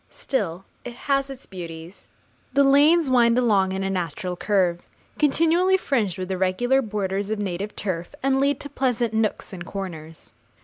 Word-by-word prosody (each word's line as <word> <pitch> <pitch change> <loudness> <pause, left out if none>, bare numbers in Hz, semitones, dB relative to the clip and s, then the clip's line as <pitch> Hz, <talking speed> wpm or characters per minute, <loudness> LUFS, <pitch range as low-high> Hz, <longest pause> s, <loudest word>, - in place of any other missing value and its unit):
Still 195 -8 -3 0.2
it 245 - -7
has 275 +1 0
its 270 -1 -9
beauties. 170 -1 -9 0.4
The 280 +1 +5
lanes 290 +4 +5
wind 240 -2 +4
along 205 -6 +3
in 190 0 -2
a 195 - -1
natural 180 0 -3
curve, 180 -3 +1 0.4
continually 330 +5 +3
fringed 220 - -1
with 185 0 -4
irregular 190 +9 +1
borders 200 -3 -2
of 220 - -1
native 200 0 -4
turf, 175 -4 -4
and 270 0 +2
lead 280 +1 +1
to 285 - -8
pleasant 245 -4 -1
nooks 220 -2 -1
and 175 -2 -6
corners. 165 -4 -8
210 Hz, 160 wpm, -24 LUFS, 185-270 Hz, 0.4 s, The